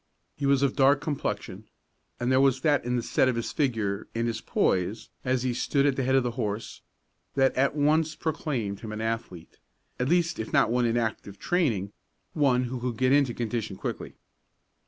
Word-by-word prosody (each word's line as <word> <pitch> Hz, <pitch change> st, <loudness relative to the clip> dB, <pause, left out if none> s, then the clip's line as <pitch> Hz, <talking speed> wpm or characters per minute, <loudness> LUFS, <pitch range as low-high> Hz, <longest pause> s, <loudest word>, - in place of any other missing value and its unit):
He 140 Hz, -, -2 dB
was 140 Hz, 0 st, +3 dB
of 140 Hz, -, +1 dB
dark 135 Hz, 0 st, +5 dB
complexion, 110 Hz, -9 st, -4 dB, 0.5 s
and 120 Hz, +1 st, 0 dB
there 130 Hz, 0 st, +4 dB
was 135 Hz, -1 st, +3 dB
that 145 Hz, -2 st, +2 dB
in 125 Hz, +1 st, -1 dB
the 120 Hz, -, -1 dB
set 130 Hz, -, +2 dB
of 125 Hz, -, 0 dB
his 115 Hz, -, -3 dB
figure, 110 Hz, -9 st, -1 dB
and 115 Hz, 0 st, 0 dB
his 115 Hz, -1 st, -2 dB
poise, 95 Hz, +5 st, 0 dB
as 130 Hz, -1 st, 0 dB
he 125 Hz, -1 st, 0 dB
stood 140 Hz, +3 st, +1 dB
at 140 Hz, -2 st, +2 dB
the 135 Hz, -, -1 dB
head 130 Hz, +1 st, +2 dB
of 135 Hz, -, +4 dB
the 120 Hz, -, -1 dB
horse, 110 Hz, -3 st, -4 dB, 0.5 s
that 135 Hz, -1 st, +3 dB
at 140 Hz, +2 st, +2 dB
once 155 Hz, +2 st, +2 dB
proclaimed 135 Hz, -, -3 dB
him 110 Hz, -, -7 dB
an 110 Hz, -, -5 dB
athlete, 110 Hz, -7 st, -5 dB, 0.4 s
at 125 Hz, +2 st, 0 dB
least 170 Hz, -1 st, +1 dB
if 110 Hz, -, -4 dB
not -, -, +3 dB
one 125 Hz, 0 st, +2 dB
in 115 Hz, +1 st, +1 dB
active 110 Hz, -3 st, -3 dB
training, 115 Hz, -, 0 dB, 0.4 s
one 135 Hz, -5 st, +3 dB
who 125 Hz, 0 st, -4 dB
could 120 Hz, -2 st, -3 dB
get 130 Hz, +1 st, +2 dB
into 140 Hz, -4 st, +3 dB
condition 110 Hz, -3 st, -3 dB
quickly. -, -, -5 dB
125 Hz, 200 wpm, -27 LUFS, 110-140 Hz, 0.5 s, dark